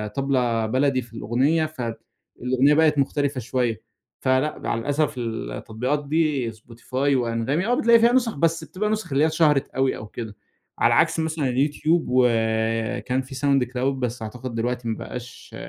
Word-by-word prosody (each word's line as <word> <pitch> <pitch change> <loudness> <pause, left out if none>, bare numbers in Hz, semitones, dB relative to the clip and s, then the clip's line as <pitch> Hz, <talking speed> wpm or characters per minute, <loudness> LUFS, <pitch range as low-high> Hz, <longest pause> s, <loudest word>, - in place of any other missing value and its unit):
طبلة 125 -5 +1
بلدي 130 +3 +1
في 115 -1 -15
الأغنية، 130 +9 +1
فالأغنية 125 0 -1
بقت 155 -1 +4
مختلفة 140 -1 0
شوية. 120 -1 -1 0.4
فلأ 130 +3 +1
مع - - -2
الأسف 145 +6 0
التطبيقات 120 +4 -3
دي 150 -6 +1
Spotify 115 +3 -18 0.2
وAnghami 125 +7 0
آه 245 - +2
بتلاقي 235 -1 +5
فيها 235 +1 +5
نسخ، 245 -3 +2
بس 165 +1 +1
بتبقى 185 +7 -3
نسخ 215 -6 -2
اللي 135 +2 +3
هي - - +5
اتشهرت 155 -3 +2
أوي 135 0 0
أو 105 - -8
كده. 110 -1 -7 0.4
على - - +4
عكس - - +3
مثلًا 160 -2 -1
الYouTube، 155 +5 +1
وآآ، 115 -2 +1
كان 130 +1 -1
في 130 +1 -10
Soundcloud 130 -2 +1 0.2
بس 125 -1 -3
أعتقد 120 +2 -6
دلوقتي 120 +1 -2
ما 110 - -2
بقاش 120 -1 -9
130 Hz, 155 wpm, -23 LUFS, 115-150 Hz, 0.4 s, بتلاقي